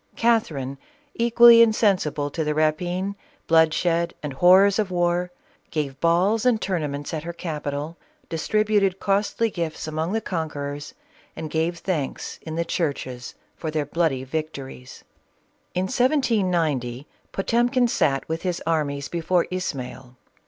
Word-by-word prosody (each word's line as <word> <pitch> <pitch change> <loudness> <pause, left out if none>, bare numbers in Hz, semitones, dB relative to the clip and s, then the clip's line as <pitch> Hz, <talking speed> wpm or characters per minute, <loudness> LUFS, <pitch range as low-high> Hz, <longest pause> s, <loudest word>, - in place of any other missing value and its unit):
Catherine, 150 - 0 0.3
equally 235 0 +7
in 225 -1 +5
sensible 155 -9 +1
to 160 - -2
the 150 0 -1
rapine, 175 +5 0 0.3
bloodshed 165 +1 +2
and 145 -2 -4
horrors 190 +7 +5
of 210 -3 0
war, 175 0 0 0.4
gave 140 -4 -3
balls 180 +6 +2
and 245 -3 +3
tournaments 150 -7 -3
at 155 - -2
her 170 +2 -6
capital, 150 -1 -4 0.3
distributed 200 +3 +1
costly 205 +3 0
gifts 165 -4 -4
among 160 +4 -2
the 225 - +1
conquerors, 145 -7 -5 0.4
and 155 -2 -6
gave 165 +2 0
thanks 165 -7 -3
in 160 -1 -6
the 170 +1 -1
churches 130 -7 -3 0.2
for 160 - -5
their 155 -1 -1
bloody 145 -3 0
victories. 135 -3 -6 0.7
In 180 - +1
1790, 180 - +1 0.3
Potemkin 240 +5 +2
sat 135 - +1
with 160 +1 -3
his 180 -2 -2
armies 145 -4 -1
before 170 +2 0
Ismail. 130 -8 -5
165 Hz, 130 wpm, -24 LUFS, 145-195 Hz, 0.7 s, equally